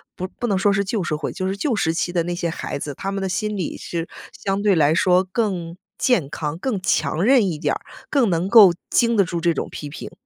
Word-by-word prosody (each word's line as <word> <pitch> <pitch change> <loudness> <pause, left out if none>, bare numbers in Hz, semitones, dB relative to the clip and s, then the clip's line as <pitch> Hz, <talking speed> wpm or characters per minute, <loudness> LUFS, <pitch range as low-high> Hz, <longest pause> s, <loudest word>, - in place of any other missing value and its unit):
不 185 - -4
不 240 - -5
能 200 -4 +1
说 200 +2 +3
是 200 +1 +1
旧 200 -1 -2
社 155 - -1
会， 150 - -4
就 185 - -3
是 195 - -2
旧 245 +4 -1
时 165 -5 +1
期 175 +1 -1
的 175 -2 0
那 175 +1 -3
些 175 -1 -2
孩 160 - -5
子， 145 -1 -5
他 195 +6 -4
们 195 0 -3
的 190 - -2
心 210 +2 -2
理 180 -5 -3
是 170 -1 -5 0.2
相 195 +1 -2
对 205 -2 +4
来 155 -1 +4
说 180 +2 +3
更 185 -4 -3 0.2
健 225 - +2
康、 150 +1 -4
更 205 -1 -2
强 155 -1 0
韧 245 -2 +5
一 165 -4 -2
点 - - 0
儿， - - -5 0.3
更 265 -7 +2
能 175 +2 0
够 205 -6 +8 0.2
经 235 -1 +2
得 200 - +5
住 175 -1 -3
这 170 0 +2
种 - - -4
批 150 - -7
评。 145 - -8
185 Hz, 275 characters per minute, -22 LUFS, 165-205 Hz, 0.3 s, 够